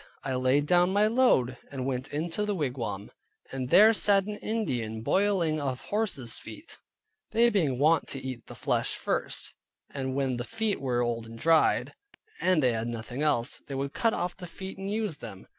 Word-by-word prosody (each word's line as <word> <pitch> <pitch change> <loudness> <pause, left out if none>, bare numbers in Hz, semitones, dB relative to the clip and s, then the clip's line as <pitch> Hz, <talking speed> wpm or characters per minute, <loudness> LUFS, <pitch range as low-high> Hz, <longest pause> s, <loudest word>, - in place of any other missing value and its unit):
I 135 - -2
laid 130 +3 +2
down 175 +2 +4
my 205 +2 +4
load, 215 - +3
and 130 -2 -5
went 130 0 -2
into 165 +7 -2
the 210 -1 -1
wigwam, 125 - -3 0.4
and 130 -1 -4
there 215 +8 +7
sat 200 -2 +4
an 210 0 -5
Indian 125 - -2
boiling 180 - +1
of 130 -3 -3
horses 200 - -2
feet 315 +2 -11 0.5
(they 235 +1 +4
being 155 - +1
wont 155 +3 +3
to 135 - -4
eat 130 -2 -7
the - - -9
flesh - - -1
first, - - -2 0.4
and 130 -2 -3
when 135 -2 0
the 120 - -3
feet 220 - -2
were 125 -3 0
old 115 -1 -2
and 115 0 -10
dried, 160 +5 +3 0.5
and 185 -5 +2
they 125 -2 +3
had 115 +1 -2
nothing 120 +3 -5
else, 145 -5 +1
they 140 - -8
would 140 +1 -3
cut 230 -1 +1
off 175 0 -2
the 180 -2 -9
feet 190 +2 -8
and 195 0 -4
use 210 -6 -2
them). 105 -7 -10
145 Hz, 190 wpm, -28 LUFS, 125-195 Hz, 0.5 s, there